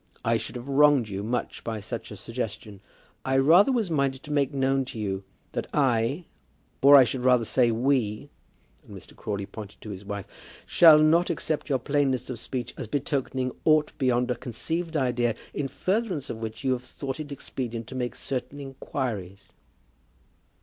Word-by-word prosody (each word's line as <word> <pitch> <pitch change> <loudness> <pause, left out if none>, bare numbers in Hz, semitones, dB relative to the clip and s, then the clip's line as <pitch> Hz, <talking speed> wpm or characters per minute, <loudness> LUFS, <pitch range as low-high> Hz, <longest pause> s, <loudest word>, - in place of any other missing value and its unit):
I 115 - +3
should 115 - -6
have 120 +2 -7
wronged 140 -4 +4
you 100 0 -4
much 120 +4 -3
by 110 -2 -3
such 100 - -5
a - - -8
suggestion. 110 -4 -6 0.4
I 135 0 +1
rather 170 - +6
was 225 -8 0
minded 135 -3 0
to 150 - -8
make 140 -2 +1
known 135 -1 +1
to 125 - -8
you 100 -2 -3 0.3
that - - -3
I, 135 +3 +1 0.6
or, 140 +1 +9
I 135 - +10
should 125 0 -3
rather 125 -2 +4
say, 120 +1 +3
we," 115 -2 0 0.5
and - - -11
Mr. - - -14
Crawley 100 -2 -4
pointed 105 0 -10
to 105 - -7
his 95 0 -8
wife, 100 -1 -5 0.4
"shall 160 -3 +8
not 160 +3 +4
accept 155 -2 -2
your 135 - +3
plainness 135 -1 0
of 120 - -6
speech 125 -2 -4
as - - -5
betokening 130 0 -1
aught 155 -1 +4
beyond 125 -2 +2
a - - 0
conceived 160 +8 -3
idea 120 -4 +1 0.2
in 145 - -2
furtherance 185 - -1
of 110 - -7
which 110 +2 -6
you 130 - +1
have 125 -1 -1
thought 135 +3 -6
it 150 -1 -6
expedient 120 -4 -4
to 130 - -9
make 125 -2 -3
certain 135 +2 -4
inquiries." 120 - -5
130 Hz, 175 wpm, -26 LUFS, 115-145 Hz, 0.6 s, I